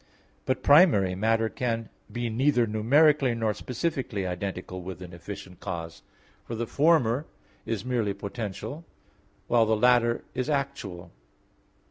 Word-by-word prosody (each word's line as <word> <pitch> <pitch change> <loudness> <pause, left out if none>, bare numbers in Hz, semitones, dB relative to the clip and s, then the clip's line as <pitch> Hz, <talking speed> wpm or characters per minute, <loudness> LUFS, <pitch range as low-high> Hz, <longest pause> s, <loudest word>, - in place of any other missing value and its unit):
But 130 0 0
primary 140 - +6
matter 110 +3 +1
can 115 -1 -3 0.2
be 120 0 -2
neither 120 +2 +2
numerically 130 +5 +3
nor 110 -2 0
specifically 125 - -3
identical 90 0 -4
with 90 +1 -7
an 90 -1 -10
efficient 90 +1 -9
cause; 85 -1 -6 0.4
for 115 - -6
the 120 +1 -2
former 145 -1 +2 0.4
is 110 -1 -2
merely 115 -6 0
potential, 110 - -6 0.6
while 115 -2 +3
the 110 0 +2
latter 120 0 +3
is 130 +3 -2
actual. 130 - -3
115 Hz, 125 wpm, -27 LUFS, 100-130 Hz, 0.6 s, primary